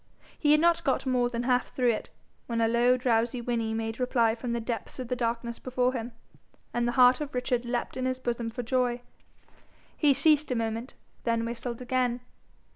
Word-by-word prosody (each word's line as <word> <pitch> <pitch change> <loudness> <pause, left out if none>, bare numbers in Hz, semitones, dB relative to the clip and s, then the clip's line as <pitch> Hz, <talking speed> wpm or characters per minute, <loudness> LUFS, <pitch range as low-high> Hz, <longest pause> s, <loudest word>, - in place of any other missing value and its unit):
He 295 - +3
had 300 - +6
not 340 +1 +3
got 270 - 0
more 250 -2 +2
than 235 0 -3
half 250 0 0
through 250 -2 +3
it, 220 - -4 0.4
when 230 -1 -1
a 225 - +3
low 240 +2 +3
drowsy 240 0 +1
whinny 235 -2 -1
made 225 +1 -3
reply 240 -3 +2
from 235 +1 -5
the 235 - -1
depths 230 -2 -4
of 255 -3 -6
the 250 - 0
darkness 235 -1 -2
before 255 0 0
him, 240 -1 -4 0.6
and 240 0 0
the 240 - 0
heart 250 +2 +6
of 290 -3 -5
Richard 250 -1 0
leaped 240 0 -2
in 255 0 -2
his 255 0 0
bosom 240 -2 -2
for 240 +2 -5
joy. 245 0 0 0.9
He 290 -3 +3
ceased 305 0 +3
a 250 - 0
moment, 230 +2 -3 0.3
then 230 -1 0
whistled 235 +1 -5
again. 250 -1 0
245 Hz, 200 wpm, -28 LUFS, 235-255 Hz, 0.9 s, had